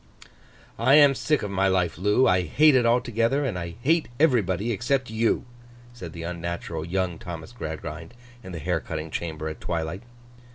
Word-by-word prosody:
'I 130 +5 +5
am 145 -2 +7
sick 150 0 0
of 105 - -3
my 95 0 +2
life, 90 -3 +1
Loo. 105 +8 +3
I, 90 0 +4
hate 150 - +4
it 125 -3 +4
altogether, 120 +3 +1
and 115 -8 -2
I 85 -1 -6
hate 160 +3 +2
everybody 115 - +2
except 120 +3 -1
you,' 115 +2 +1 0.5
said 90 -9 -8
the 85 - -7
unnatural 85 -1 -4
young 90 0 -2
Thomas 85 +2 -8
Gradgrind 80 -2 -7 0.3
in 95 - -10
the 85 - -5
hair 85 +2 -1
cutting 80 -1 -6
chamber 80 -2 -4
at 80 - -7
twilight. 85 +2 -3
95 Hz, 170 wpm, -25 LUFS, 85-120 Hz, 0.5 s, am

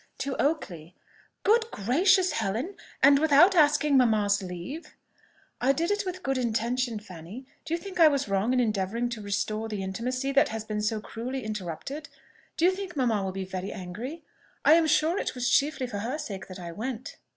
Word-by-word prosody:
"To 275 -1 -3
Oakley." 180 - -2 0.5
"Good 450 +2 +3
gracious, 365 - +3
Helen! 225 - -2 0.3
and 280 +1 +7
without 315 +5 +6
asking 300 -3 +4
mamma's 210 -5 +3
leave?" 185 - -7 0.7
"I 265 +3 +4
did 335 +7 -1
it 410 -1 -1
with 365 0 -3
a - - -18
good 270 -4 -1
intention, 235 0 -1
Fanny. 195 +4 -10 0.2
Do 320 +2 -1
you - - -2
think 370 +1 -8
I 325 - +9
was 280 -4 +1
wrong 195 +4 +1
in 255 - +2
endeavouring 220 +1 0
to 235 -3 -5
restore 215 +2 -2
the 205 -3 -3
intimacy 255 +8 -2
that 275 +1 +4
has 220 -1 -4
been 215 -1 -3
so 215 0 -1
cruelly 250 +4 -5
interrupted? 215 - -5 0.5
Do 330 - +3
you 365 - +6
think 380 -2 -6
mamma 235 -7 +1
will 190 - -2
be 190 0 -4
very 190 +1 -5
angry? 220 - -7 0.4
I - - +8
am 325 -1 +4
sure 315 +4 +2
it - - -3
was 245 -1 -1
chiefly 275 -2 +2
for 220 -5 -5
her 240 +8 -3
sake 195 -10 -6
that 185 - -9
I 170 -1 -6
went." 240 +6 -6
245 Hz, 195 wpm, -27 LUFS, 205-300 Hz, 0.7 s, I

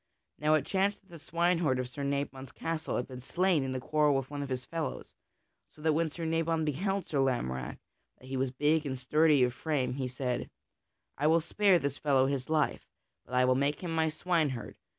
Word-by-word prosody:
Now 150 +1 +4
it 150 -3 +1
chanced 195 +1 0
that 195 - -31
the 170 - -11
swineherd 170 -3 +1
of 125 -1 -2
Sir 135 +3 -6
Nabon's 140 -2 -3
castle 165 -1 -3
had 125 - -2
been 125 -1 -8
slain 175 +2 +1
in 130 -1 -3
a - - -1
quarrel 150 +2 +2
with 135 0 -2
one 145 -1 -4
of 140 - -4
his 125 -1 -3
fellows, 165 -2 -4 0.6
so - - -22
that 160 -1 +3
when 165 +1 +1
Sir 165 +2 -6
Nabon 165 0 +1
beheld 190 +6 -1
Sir 145 - -1
Lamorack, 65 - -1 0.4
that - - -17
he 130 +1 -5
was 130 0 0
big 150 +4 +2
and 130 -1 -3
sturdy 150 +2 +4
of 125 -1 +1
frame, 140 -2 -1
he 130 -1 -2
said: 125 -1 -3 0.7
"I 150 - +3
will 165 +2 +5
spare 190 +3 +3
this 140 -3 -3
fellow 135 -3 +3
his 135 -1 -2
life, 155 -2 0 0.4
but 125 - -6
I 125 0 +5
will 130 - +4
make 140 +3 0
him 170 -2 -3
my 160 -1 +2
swineherd. 155 -7 -1
145 Hz, 210 wpm, -31 LUFS, 130-165 Hz, 0.7 s, will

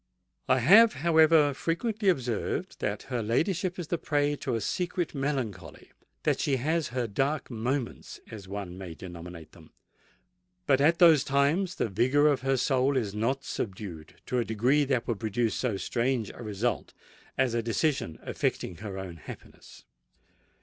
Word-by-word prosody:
I 130 - +5
have, 210 - +7
however, 160 -3 +5
frequently 205 - -1
observed 125 - -2
that - - -2
her 125 -3 -3
ladyship 175 - 0
is 170 -4 -6
the 170 - -1
prey 145 -1 +1
to 130 -4 -2
a - - 0
secret 175 - -2
melancholy—that 135 -7 -4
she 140 - +1
has 155 +4 0
her 125 0 -2
dark 135 +7 -1
moments, 120 +3 -3
as 105 -4 -9
one 95 -2 -6
may 90 -4 -7
denominate 85 -2 -10
them; 80 -4 -17 1.0
but 135 -1 +3
at 165 +4 +4
those 165 -5 +7
times 150 +7 +1
the - - 0
vigour 130 +8 +3
of 140 -4 +1
her 135 0 +1
soul 130 +1 +2
is 105 -6 -1
not 125 +6 -1
subdued 95 - -6
to 125 - -1
a - - +2
degree 125 +7 +2
that 130 -4 0
would 115 -4 -2
produce 110 +1 0
so 115 -6 -1
strange 120 +1 -1
a - - -12
result 110 +1 -2 0.4
as 130 -3 +2
a 115 - +1
decision 115 - -1
affecting 90 - -2
her 100 -2 -6
own 95 -3 -7
happiness. 75 - -12
130 Hz, 155 wpm, -28 LUFS, 110-150 Hz, 1.0 s, have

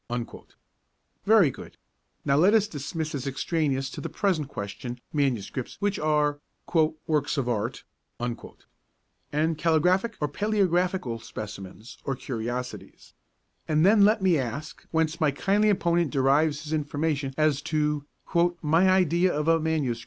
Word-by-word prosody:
Very 205 -9 +6
good: - - -12 0.5
now 140 - +3
let 185 +9 +5
us 215 -1 +3
dismiss 155 +1 -4
as 140 -1 -4
extraneous 135 -1 -1
to - - -7
the - - -4
present 180 -8 0
question 120 0 -6
manuscripts 130 -4 -2
which 205 -1 0
are 150 -1 +1 0.7
'works 150 -2 0
of 135 -3 0
art,' 115 0 -2 0.4
and 150 +5 -5
calligraphic 180 +7 +2
or 150 - 0
palæographical 180 - 0
specimens 105 +2 -9
or 135 - -2
curiosities, 125 0 -6 0.5
and 155 +1 +3
then 205 +1 +6
let 210 0 +4
me 175 -5 +4
ask 130 +4 -6
whence 160 +1 0
my 155 - +4
kindly 200 +9 +2
opponent 170 -4 +2
derives 145 +2 +2
his 155 0 -5
information 145 -2 -1
as 155 -2 +2
to 150 -2 -1 0.6
'my 165 +5 +4
idea 180 -1 +3
of 150 0 -2
a 165 0 +4
MS. 155 -7 -1
150 Hz, 130 wpm, -26 LUFS, 135-170 Hz, 0.7 s, Very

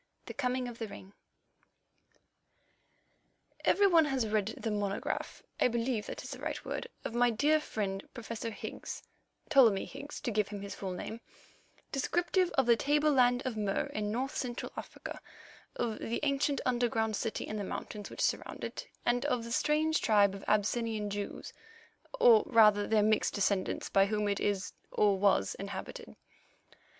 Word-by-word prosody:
THE - - -7
COMING 255 -2 -1
OF 235 -1 -8
THE 225 - -3
RING 195 -1 -11 2.5
Every 405 - +4
one 335 -5 +6
has 270 -5 0
read 210 -2 +1
the 225 - -3
monograph, 205 -1 -3 0.2
I - - +5
believe 235 -2 -1
that - - -6
is - - -8
the - - -6
right - - -4
word, - - -4 0.2
of - - -3
my 245 +1 +4
dear 295 +7 +3
friend, 200 -9 -3
Professor 230 -1 -5
Higgs—Ptolemy 225 0 0
Higgs 290 +1 -8
to 250 - -2
give 210 -2 +1
him 205 -1 -6
his 200 - -6
full 195 - -5
name—descriptive 280 - -3
of 265 - +4
the 235 0 +6
tableland 275 -3 +3
of 255 -3 -2
Mur 205 -2 -1
in 210 -1 -2
North 260 +5 -2
Central 245 -2 -3
Africa, - - -7 0.5
of 225 -3 -2
the 235 - -2
ancient 280 -1 +1
underground 235 -3 +1
city 220 - -2
in 215 - -4
the 205 - -2
mountains 205 +1 -6
which - - -6
surrounded - - -1
it, - - -8 0.2
and 245 +1 +2
of 250 -5 0
the 235 - -7
strange 305 +4 +2
tribe 205 -3 +4
of 195 - -8
Abyssinian 215 0 0
Jews, 205 0 -5 0.7
or 475 -3 +8
rather 210 -2 +5
their 215 -1 +3
mixed 215 0 +2
descendants, 200 -2 0
by 195 0 +4
whom 210 0 0
it 200 -1 0
is, 200 -2 -1 0.2
or 200 -2 +3
was, 200 -1 +3
inhabited. 200 - -7
225 Hz, 160 wpm, -32 LUFS, 205-260 Hz, 2.5 s, or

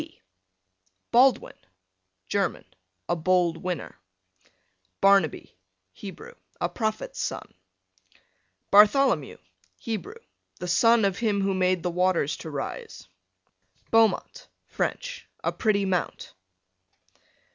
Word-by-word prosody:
B - - -13 0.9
Baldwin, 255 +2 +4 0.7
German, - - -1 0.4
a 175 - +1
bold 175 0 +1
winner. 175 -2 -5 1.0
Barnaby, 195 -6 +2 0.4
Hebrew, 210 - -10 0.3
a - - 0
prophet's 225 - -3
son. - - -4 1.2
Bartholomew, 210 +7 +4 0.4
Hebrew, 235 - -5 0.4
the 180 - -5
son 230 +5 +4
of 195 -1 -1
him 210 -4 +1
who 195 0 +1
made 185 -1 +1
the 180 - -1
waters 180 -4 +1
to 160 - -8
rise. 300 - -6 0.8
Beaumont, 225 -1 +2 0.2
French, - - -4 0.2
a - - +1
pretty 205 -3 +1
mount. 185 -2 -2
195 Hz, 95 wpm, -26 LUFS, 180-230 Hz, 1.2 s, Baldwin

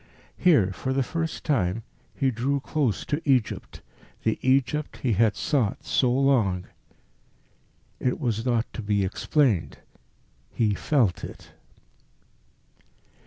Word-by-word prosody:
Here, 115 - +4
for 130 +7 -3
the 135 0 +1
first 165 +4 -3
time, 115 - 0 0.3
he 135 -2 +1
drew 130 +4 0
close 135 -5 -1
to 150 +2 -2
Egypt, 130 -6 0 0.4
the 110 - 0
Egypt 135 +3 +1
he 125 -4 +2
had 110 +1 +3
sought 125 -9 0
so 125 -2 +2
long. 120 -9 +2 1.3
It 125 - -1
was 115 -6 -1
not 120 -2 +1
to - - -5
be 100 -2 +1
explained. 115 - +1 0.7
He 110 -3 +1
felt 115 - +1
it. - - -9
125 Hz, 120 wpm, -26 LUFS, 105-140 Hz, 1.3 s, Here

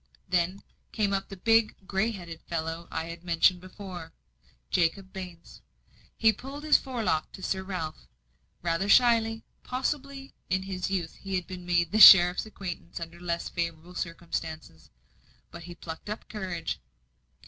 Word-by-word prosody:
Then 180 +2 0 0.3
came 205 -3 0
up 195 0 -2
the 195 - -8
big, 225 +2 +3
grey 195 +3 +1
headed 175 -6 -8
fellow 165 0 -3
I 160 - -3
have 170 0 -7
before 180 +2 0
mentioned 160 - -15 0.6
Jacob 185 +3 +1
Baines. 180 -3 -9 0.6
He 220 -1 +5
pulled 275 +7 -8
his 305 -2 +5
fore 250 -4 0
lock 160 -5 0
to 190 - -10
Sir 190 - -1
Ralph, 180 -5 -5 0.6
rather 175 +3 0
shyly; 225 -1 +4 0.2
possibly 270 +1 -3 0.2
in 185 +1 +1
his 190 -1 -3
youth 180 -4 -2
he 195 -1 -4
had 180 -2 -2
made 175 -2 0
the 215 - +2
sheriff's 180 -1 +10
acquaintance 180 -5 -7
under 170 +1 -8
less 170 -1 -2
favourable 170 0 -4
circumstances. 160 - -5 0.6
But 170 - -9
he 175 -1 -9
plucked 165 +4 -8
up 210 - -5
courage. 185 -6 -4
185 Hz, 150 wpm, -28 LUFS, 170-205 Hz, 0.6 s, sheriff's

